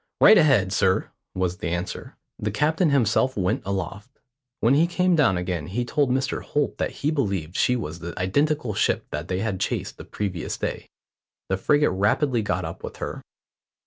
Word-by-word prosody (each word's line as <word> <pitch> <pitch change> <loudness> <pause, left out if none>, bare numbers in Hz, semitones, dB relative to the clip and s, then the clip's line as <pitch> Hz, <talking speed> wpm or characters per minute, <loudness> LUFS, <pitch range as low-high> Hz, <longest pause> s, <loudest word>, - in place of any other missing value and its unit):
"Right - - +8
ahead, 110 - +3
sir," 95 -1 +1 0.2
was 90 -1 -1
the 100 - -4
answer. 90 +2 -4 0.2
The 105 - -1
captain 155 - +1
himself 130 -1 +2
went 90 -2 0
aloft. 100 +5 -5 0.4
When 115 +4 +3
he 160 +4 +4
came 180 +1 +2
down 135 - +3
again 90 -4 -3
he 120 +6 -2
told 140 +2 +1
Mr 130 0 0
Holt 145 -1 -2
that - - 0 0.2
he 150 - +3
believed 95 - -2
she 125 - +2
was 85 -8 -5
the 85 0 -7
identical 140 +6 0
ship - - +1
they 75 +5 -3
had 105 -4 -2
chased - - -2
the - - -7
previous 95 -6 -4
day. - - -4 0.6
The 95 - +1
frigate 145 +5 +3
rapidly 110 +6 +1
got 100 - -1
up - - -7
with - - -6
her. - - -5
105 Hz, 175 wpm, -24 LUFS, 95-140 Hz, 0.6 s, Right